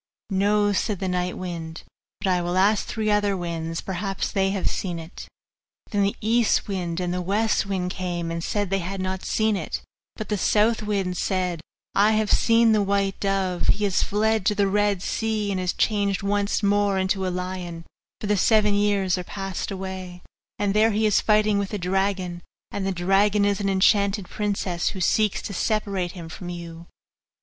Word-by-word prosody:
'No,' 205 +1 +2
said 205 +1 0
the 190 - -3
night 180 0 -1
wind, 170 -3 -6 0.4
'but - - -2
I 180 -1 +2
will 175 +1 -1
ask 200 +2 +3
three 215 -2 -1
other 205 -1 +2
winds; 165 -2 -4
perhaps 195 +1 -3
they 195 -1 +1
have 195 -1 -1
seen 175 -3 -2
it.' 165 +1 -9 0.6
Then 205 -2 +1
the 200 0 +1
east 230 +1 +2
wind 180 -4 -3
and 180 -1 -1
the 180 - -1
west 205 +3 +1
wind 185 -2 -2
came, 175 -3 -3
and 165 0 -3
said 205 -1 -1
they 195 - +2
too 170 - -5
had 195 +2 -4
not 185 0 -3
seen 220 -1 +1
it, - - -4 0.3
but 215 - -6
the 210 -2 0
south 220 +4 +3
wind 195 -4 -1
said, 180 -3 -1 0.3
'I 205 +2 +4
have 215 -1 +1
seen 230 0 +4
the 215 -1 +3
white 200 -1 0
dove 195 -3 -1
he 210 - +2
has 195 -2 +2
fled 220 0 +1
to 210 - +3
the 200 - +2
Red 205 -1 +1
Sea, 220 -2 -1
and 190 -1 -1
is 180 -1 0
changed 200 -3 0
once 205 +1 0
more 200 -1 +2
into 190 0 0
a - - 0
lion, 180 -2 -5 0.3
for - - -5
the 205 0 +2
seven 210 +1 +4
years 200 -3 +2
are - - -4
passed 195 0 -5
away, 185 -2 -6 0.3
and 205 -1 0
there 215 +2 +4
he 215 0 +1
is 210 - +3
fighting 210 -1 +3
with 200 +1 -3
a - - -1
dragon; 185 -1 -1 0.3
and 195 -1 -2
the - - +1
dragon 195 +3 +2
is 200 0 +1
an 195 - 0
enchanted 200 0 +2
princess, 200 -4 -2
who 190 - -6
seeks 210 +3 +1
to 200 - -5
separate 195 -3 -1
him 170 -3 -8
from 175 +2 -8
you. 170 -1 -8
195 Hz, 195 wpm, -24 LUFS, 180-205 Hz, 0.6 s, I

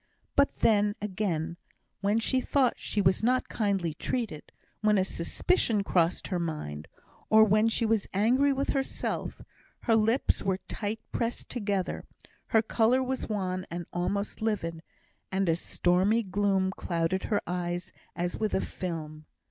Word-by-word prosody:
But 280 0 +3
then, 205 -2 +4
again, 180 -5 -2 0.4
when 205 +2 +2
she 255 +3 +1
thought 260 -1 +2
she 210 - -1
was 185 0 +3
not 255 +3 +2
kindly 195 -7 0
treated, 210 -3 -3 0.3
when 210 -1 +4
a 190 - +3
suspicion 210 - +1
crossed 175 -3 +1
her 180 -3 0
mind, 115 - -4 0.4
or 220 0 +8
when 215 +1 +4
she 230 +1 +1
was 220 -2 +1
angry 250 +8 +3
with 275 +1 -1
herself, 270 -1 -3 0.4
her 225 - +3
lips 225 +4 +2
were 190 -1 0
tight 215 +1 -3
pressed 235 0 -2
together, 200 -6 -2 0.4
her 220 0 +3
colour 235 +4 +3
was 260 -1 -3
wan 185 -3 -1
and 175 +1 -5
almost 200 +5 -2
livid, 165 -7 -1 0.5
and 190 0 +1
a 165 - +3
stormy 185 +6 +2
gloom 195 -1 +1
clouded 170 0 -1
her 205 -2 0
eyes 175 0 -3 0.2
as 175 +1 -2
with 215 -1 0
a - - +3
film. 155 -4 -5
200 Hz, 150 wpm, -29 LUFS, 175-225 Hz, 0.5 s, or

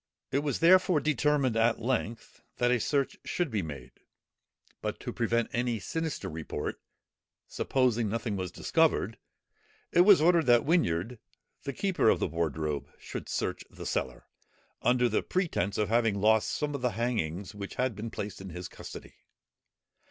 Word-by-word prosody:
It 135 - +2
was 145 +1 -2
therefore 180 -1 +6
determined 150 -4 +1
at 115 +1 +3
length, 115 -1 -3 0.2
that 120 0 +2
a 125 - +3
search 140 +4 0
should 175 -6 -2
be 105 -2 0
made; 70 -6 -8 0.9
but - - -3
to - - -5
prevent 115 0 0
any 120 -1 0
sinister 160 - -3
report, 80 -1 -5 0.7
supposing 120 -4 +1
nothing 110 -1 -2
was 95 -2 -3
discovered, 150 - +1 0.7
it 175 - +5
was 195 +1 +8
ordered 165 -1 +4
that 120 -1 +5
Whinyard, 120 - +1 0.5
the 140 - -3
keeper 190 - +2
of - - +3
the - - +1
wardrobe, 75 -3 -2
should - - -7
search - - -2
the - - -10
cellar, - - -2 0.6
under 125 0 +3
the - - +1
pretence 150 - -1
of 105 -1 0
having 115 -3 +2
lost 110 +1 +3
some 150 -1 -2
of 140 - -4
the 125 -1 0
hangings, 100 -5 -2
which 100 -1 -7
had 130 -3 0
been 110 +3 -5
placed 105 -2 -6
in 95 - -7
his 90 +1 -6
custody. - - -10
115 Hz, 160 wpm, -29 LUFS, 100-140 Hz, 0.9 s, was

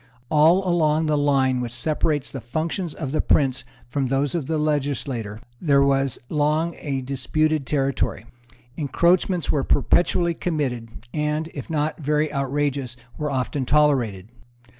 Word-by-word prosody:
All 165 +5 +4
along 160 -2 +2
the 155 -1 +1
line 135 -3 +2
which 120 -2 -4
separates 150 +2 -1
the 135 - -6
functions 160 - -3
of 135 -4 -4
the 155 - +1
prince 135 -2 +2 0.2
from 130 +2 -2
those 135 +2 +1
of 165 -6 -2
the 160 - 0
legislator 140 -7 -2 0.2
there 140 -4 +4
was 135 -2 +1
long 155 +3 +1
a 135 -3 -3
disputed 140 +3 0
territory. 135 -7 -1 0.5
Encroachments 170 +4 +1
were 145 - 0
perpetually 170 +4 +2
committed, 140 -10 -2 0.2
and, 150 +1 -1
if 140 - -7
not 155 0 -1
very 150 0 0
outrageous, 140 -2 -1 0.2
were 150 -1 -1
often 135 +1 -1
tolerated. 125 -9 +2
145 Hz, 140 wpm, -23 LUFS, 135-155 Hz, 0.5 s, All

